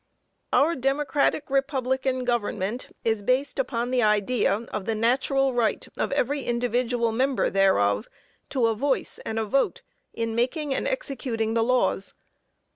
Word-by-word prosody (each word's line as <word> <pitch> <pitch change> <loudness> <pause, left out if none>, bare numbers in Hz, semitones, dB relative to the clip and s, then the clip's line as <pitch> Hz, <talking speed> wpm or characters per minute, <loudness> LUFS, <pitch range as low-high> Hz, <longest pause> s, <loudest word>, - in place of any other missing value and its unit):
Our 330 +4 +3
democratic 280 +2 0
republican 265 -2 0
government 230 -1 -1 0.2
is 220 -2 +1
based 260 +7 0
on 240 0 -1
the 255 -1 +2
idea 210 +1 +2
of 210 -1 -3
the 225 - -1
natural 265 +4 +2
right 235 -2 0
of - - -2
every 280 +3 0
individual 240 -1 0
member 260 +4 +1
thereof 105 - +2 0.4
to 255 -4 +1
a 225 - +3
voice 265 +5 -1
and 220 - -3
a 220 - 0
vote 270 +6 0 0.3
in 230 -1 -3
making 270 +5 0
and 270 - -1
executing 260 - -2
the 230 0 +2
laws. 225 -5 +1
245 Hz, 140 wpm, -25 LUFS, 225-270 Hz, 0.4 s, Our